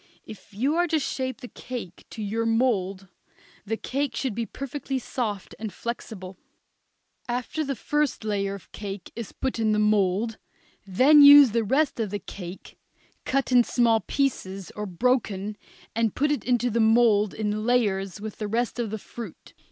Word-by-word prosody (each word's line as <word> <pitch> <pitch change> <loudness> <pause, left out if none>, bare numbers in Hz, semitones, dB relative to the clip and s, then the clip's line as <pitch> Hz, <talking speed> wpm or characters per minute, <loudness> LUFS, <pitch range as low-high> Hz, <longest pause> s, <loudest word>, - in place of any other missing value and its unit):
If 215 - -12
you 250 +9 0
are 350 0 +3
to 320 - +1
shape 260 -3 -3
the 245 - -7
cake 235 -8 -8
to 220 - -6
your 225 +3 -1
mould 200 -5 0 0.6
the 225 +1 -1
cake 275 0 -2
should 260 -1 -2
be 230 +1 -3
perfectly 275 0 -4
soft 220 -6 -4
and 220 -1 -4
flexible. 195 -6 -6 0.9
After 250 +6 -2
the 275 -2 -2
first 295 +1 -1
layer 200 -2 -1
of 195 - -14
cake 200 -3 -7
is 230 -3 -6
put 260 -3 -3
against 215 -1 +2
the - - +1
mould, 210 +1 +1 0.5
then 265 +10 +6
use 285 -3 +10
the 230 +1 +1
rest 270 +5 +1
of 220 -3 -1
the 205 - -2
cake 180 -1 -10 0.5
cut 275 0 0
in 245 -1 +6
small 230 -2 +3
pieces, 195 -9 -2
or 210 0 -5
broken, 210 0 0 0.4
and 225 -2 +1
put 295 +2 +1
into 245 -1 +1
the 230 - 0
mould 220 -2 +4
in 215 0 -2
layers 205 -5 +1
with 215 0 -7
the 210 - -3
rest 235 +3 -1
of 235 -3 -1
the 220 - -3
fruit. 220 -2 -10
225 Hz, 165 wpm, -26 LUFS, 205-255 Hz, 0.9 s, use